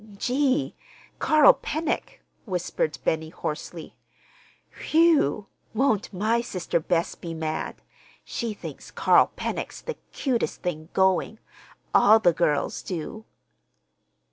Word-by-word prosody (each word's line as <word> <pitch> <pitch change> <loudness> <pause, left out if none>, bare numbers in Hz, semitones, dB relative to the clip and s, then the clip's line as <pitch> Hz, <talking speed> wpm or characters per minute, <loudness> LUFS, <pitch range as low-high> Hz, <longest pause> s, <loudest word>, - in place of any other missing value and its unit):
"Gee! 270 +4 +1 0.5
Carl 310 -2 +6
Pennock!" 315 +2 -3 0.2
whispered 180 -5 -2
Benny 160 0 0
hoarsely. 160 +1 -6 0.9
"Whew! 310 - +4 0.3
Won't 220 -4 +1
my 215 +5 +1
sister 185 -7 -2
Bess 170 +1 0
be 165 -1 -7
mad? 155 -1 -3 0.5
She 230 -3 -3
thinks - - -9
Carl - - +4
Pennock's - - -4
the 480 - -6
cutest 255 -5 -2
thing 160 -3 -4
going. 190 +3 +2 0.6
All 215 +2 +7
the 175 -6 +3
girls 155 -3 0
do!" 190 +5 -6
195 Hz, 105 wpm, -25 LUFS, 165-250 Hz, 0.9 s, All